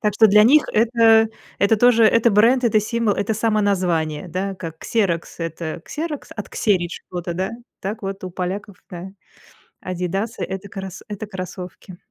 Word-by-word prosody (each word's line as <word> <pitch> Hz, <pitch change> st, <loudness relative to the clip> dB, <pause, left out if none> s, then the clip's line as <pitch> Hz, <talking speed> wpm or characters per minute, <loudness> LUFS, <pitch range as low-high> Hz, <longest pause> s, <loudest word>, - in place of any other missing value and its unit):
Так 210 Hz, -2 st, 0 dB
что 220 Hz, +1 st, +7 dB
для 210 Hz, +1 st, +7 dB
них 295 Hz, +5 st, +6 dB
это 225 Hz, 0 st, +5 dB, 0.3 s
это 200 Hz, +2 st, +4 dB
тоже 235 Hz, 0 st, +5 dB
это 230 Hz, +1 st, +5 dB
бренд, 235 Hz, +5 st, +4 dB
это 215 Hz, -2 st, +4 dB
символ, 225 Hz, -1 st, 0 dB
это 205 Hz, +2 st, -1 dB
самоназвание, 185 Hz, -7 st, 0 dB
да. 190 Hz, +3 st, -3 dB
Как 165 Hz, -3 st, -8 dB
"Ксерокс"- 180 Hz, -7 st, -1 dB
это 165 Hz, 0 st, -4 dB
"Ксерокс", 310 Hz, -2 st, -5 dB
отксерить 195 Hz, -4 st, 0 dB
чего-то, 175 Hz, -1 st, -6 dB
да, 185 Hz, +3 st, -2 dB, 0.3 s
так 210 Hz, +3 st, -4 dB
вот 195 Hz, -1 st, -5 dB
у 185 Hz, -, -5 dB
поляков, 185 Hz, +2 st, -4 dB
да, 180 Hz, +2 st, -7 dB, 0.7 s
"Адидасы"- 185 Hz, +5 st, -3 dB
это 190 Hz, +1 st, -5 dB
крос 190 Hz, -2 st, -7 dB
это 210 Hz, 0 st, -6 dB
кроссовки. 185 Hz, -1 st, -8 dB
200 Hz, 155 wpm, -21 LUFS, 180-220 Hz, 0.7 s, что